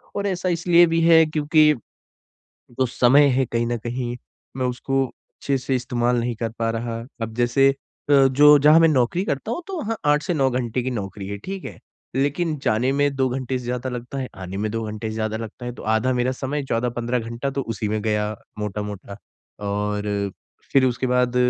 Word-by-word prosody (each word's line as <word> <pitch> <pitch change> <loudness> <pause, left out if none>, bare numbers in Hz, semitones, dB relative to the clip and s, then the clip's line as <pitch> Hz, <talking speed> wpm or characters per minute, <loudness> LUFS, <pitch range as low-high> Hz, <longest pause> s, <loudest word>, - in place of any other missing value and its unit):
और 200 0 -1
ऐसा 185 -1 -1
इसलिए 175 0 +5
भी 165 - +2
है 165 -1 +6
क्योंकि 155 0 +3 1.1
जो 130 - +4
समय 130 +4 +5
है 130 0 +2
कहीं 115 0 +1
ना 120 0 -1
कहीं, 120 +1 -4 0.4
मैं 130 - 0
उसको 135 +2 -1
अच्छे 135 +2 -5
से 135 +1 -2
इस्तेमाल 120 0 0
नहीं 120 0 -2
कर 115 0 -3
पा 115 0 0
रहा। 115 0 -3 0.2
अब 110 0 -4
जैसे, 120 +3 +3 0.4
अ, 140 -2 +6
जो 150 +2 +7
जहाँ 150 +3 +6
मैं 165 - +6
नौकरी 150 +5 +1
करता 140 +3 -3
हूँ, 350 - -4
तो 385 -1 -5
वहाँ 225 -2 -2 0.2
8 150 - +1
से 175 +1 -1
9 135 -3 +2
घंटे 125 -1 -1
की 130 - -2
नौकरी 100 -3 -5
है, 100 - -4
ठीक 195 - -7
है। - - -8 0.4
लेकिन 150 +4 0
जाने 120 +5 +2
में 145 0 +1
2 130 -1 +2
घंटे 130 0 -2
से 125 - -9
ज़्यादा 125 +1 -3
लगता 125 +2 -6
है, 130 - -3
आने 95 0 -7
में 105 +1 -1
2 115 0 -2
घंटे 110 +1 -5
से 110 - -5
ज़्यादा 110 0 -2
लगता 115 +2 -8
है। 120 - -4
तो - - -10
आधा 120 +4 +1
मेरा 125 +1 +1
समय 140 +2 -3
14-15 120 0 -1
घंटा 115 +4 -4
तो 135 +1 -2
उसी 105 +1 -3
में 110 +1 -1
गया, 105 -1 0 0.3
मोटा-मोटा, 105 -1 -5 0.4
और 105 0 -2 0.4
फिर 135 -1 +5
उसके 125 +1 0
बाद 125 0 +1
125 Hz, 205 wpm, -22 LUFS, 115-140 Hz, 1.1 s, जो